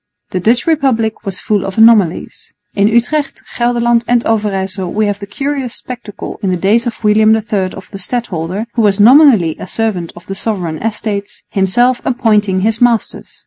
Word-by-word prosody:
The 185 - -1
Dutch 230 +6 +2
Republic 250 -9 0
was 190 -2 -4
full 205 -1 -1
of 195 +1 -6
anomalies. 220 -6 +2 0.2
In 200 0 +2
Utrecht, 275 +6 0
Gelderland 240 -1 +1
and 240 -1 +1
Overyssel 195 -4 -1
we 215 0 +1
have 205 -1 -2
the 200 - -8
curious 275 +2 -3
spectacle 235 -5 -8
in 195 - -1
the 180 - 0
days 215 +7 +1
of 230 - -6
William 215 +1 +4
III 210 -4 -2
of 190 - -11
the 195 - -8
stadholder, 195 -3 -3
who 235 - 0
was 205 -1 +2
nominally 230 - +6
a - - -7
servant 190 -6 -2
of 175 - -13
the 195 - -5
Sovereign 185 -6 -4
Estates, 210 -2 -4
himself 240 +6 +1
appointing 210 -6 +1
his 220 +3 0
masters. 240 -2 0
215 Hz, 175 wpm, -14 LUFS, 195-235 Hz, 0.2 s, nominally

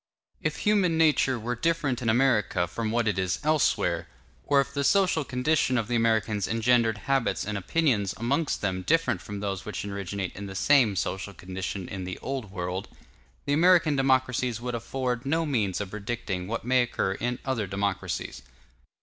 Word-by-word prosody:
If - - -1
human 195 -6 +2
nature 150 -5 +3
were 120 +2 -3
different 145 -2 0
in 115 - 0
America 115 -7 +2
from 110 +6 -3
what 115 0 +1
it 100 -3 +1
is 95 -1 0
elsewhere; 90 - +1 0.4
or 140 -1 +3
if 140 - -1
the 140 - -1
social 185 -1 +3
condition 130 0 +1
of 115 -2 -1
the 120 - -1
Americans 110 -3 +1
engendered 115 -1 +2
habits 135 -3 +1
and 105 +1 -3
opinions 105 - +1
amongst 140 +7 0
them 95 -2 -1
different 130 - +1
from 100 +3 -7
those 100 -2 -3
which 105 -1 -5
originate 100 -1 -4
in 100 +1 -6
the 95 - -8
same 120 -2 +4
social 95 +1 -3
condition 95 +1 -5
in 95 -1 -5
the 90 0 -5
Old 130 -5 -4
World, 90 0 -4 0.6
the 145 - +1
American 170 -1 +5
democracies 130 -3 +1
would 125 +1 -4
afford 125 +1 -2
no 160 +4 0
means 110 - 0
of 100 -2 -5
predicting 105 -3 -4
what 115 +1 -4
may 130 0 +4
occur 120 -5 -1
in 120 +4 -2
other 125 -7 -1
democracies. 100 +1 -3
115 Hz, 175 wpm, -27 LUFS, 100-135 Hz, 0.6 s, American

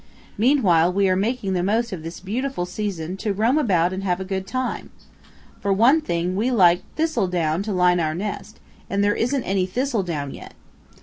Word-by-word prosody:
Meanwhile 195 - +3
we 195 0 +2
are 185 - +3
making 205 0 -1
the 180 - 0
most 225 +5 0
of 175 - -5
this 165 +2 -7
beautiful 235 +1 -3
season 180 -2 -4
to 205 0 -2
roam 230 +9 +2
about 185 - +2
and 190 +1 -4
have 180 -2 0
a 190 - -4
good 190 0 -4
time. 255 +4 -3 0.7
For 200 - -1
one 240 +11 +4
thing 175 - -2
we 220 +6 +1
like 180 -8 +4
thistledown 180 - 0
to 210 +1 -4
line 180 -1 +3
our 155 -2 -1
nest, 205 +2 -5 0.3
and 200 0 0
there 205 0 +3
isn't 250 +4 0
any 190 -1 0
thistledown 185 - -2
yet. - - -11
195 Hz, 185 wpm, -22 LUFS, 180-230 Hz, 0.7 s, one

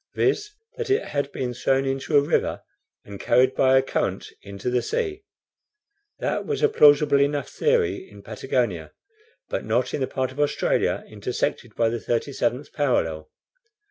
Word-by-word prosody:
viz., 420 0 +1 0.3
that 465 -2 -4
it 405 +2 +2
had 140 -1 -2
been 125 -3 -3
thrown 135 +2 +1
into 135 +2 0
a - - +6
river 140 - 0 0.4
and 100 -1 -9
carried 125 +2 +3
by 130 0 +4
a 130 - +4
current - - -2
into 100 +2 -8
the 125 0 +2
sea. 410 - -2 1.0
That - - -2
was 435 -1 -3
a 445 - +5
plausible 145 - +5
enough 145 0 0
theory 440 -5 0
in - - -14
Patagonia, - - -2 0.5
but - - -3
not - - 0
in - - -2
the 130 - 0
part 130 -1 -2
of 130 - -11
Australia 145 0 +1
intersected - - -3
by 115 -1 +2
the 120 +1 -3
37th 125 +2 -2
parallel. 80 - 0
135 Hz, 160 wpm, -24 LUFS, 125-150 Hz, 1.0 s, a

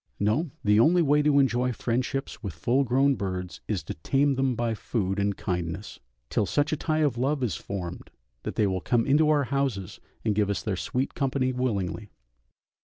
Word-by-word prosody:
No, 110 +11 +1
the 105 0 +4
only 170 +8 +5
way 150 0 +4
to 145 -1 +3
enjoy 125 -2 +3
friendships 125 +4 -2
with 100 -8 -5
full 120 +10 +2
grown 135 +3 +3
birds 95 -5 -4
is 100 -7 -2
to - - -5
tame 135 - +1
them 135 -1 +1
by 115 0 0
food 100 -3 -2
and 100 0 0
kindness, 90 +2 -4 0.3
till 100 - +1
such 145 +1 +1
a - - +3
tie 155 +1 0
of 125 -5 -1
love 135 +2 0
is 105 -9 0
formed 90 -1 -6 0.3
that - - -5
they 105 - +3
will 95 -2 -1
come 115 +2 +1
into 150 +3 +4
our 150 -2 +4
houses 130 -8 -2 0.3
and 110 - +2
give 105 -1 +1
us 100 - -1
their 105 -3 -1
sweet 125 +8 -2
company 130 -1 0
willingly. 105 -5 -2
120 Hz, 190 wpm, -27 LUFS, 100-140 Hz, 0.3 s, only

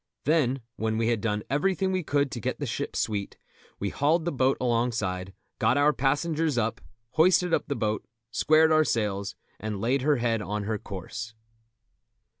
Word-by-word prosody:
Then, 135 -4 +2 0.2
when 110 0 -1
we 115 0 +1
had 115 -3 +1
done 105 -2 -1
everything 190 +7 +1
we 185 -1 0
could 145 -3 0
to 120 - -4
get - - -2
the - - -2
ship - - -3
sweet, 100 -2 -2 0.4
we 100 - -2
hauled 155 - +1
the 175 - 0
boat 130 0 +2
alongside, 115 -7 0 0.3
got 130 - +3
our 145 +1 +4
passengers 150 +2 0
up, 115 +1 0 0.3
hoisted 180 +1 +4
up - - +1
the 140 - -1
boat, 110 -3 -1 0.3
squared 155 +4 +4
our 155 0 +5
sails, 100 -7 -1 0.2
and 105 -1 -4
laid 125 +6 +1
her 145 +2 +3
head 115 -3 0
on 105 0 -3
her 110 +1 -2
course. 105 +4 -7
120 Hz, 175 wpm, -27 LUFS, 110-150 Hz, 0.4 s, our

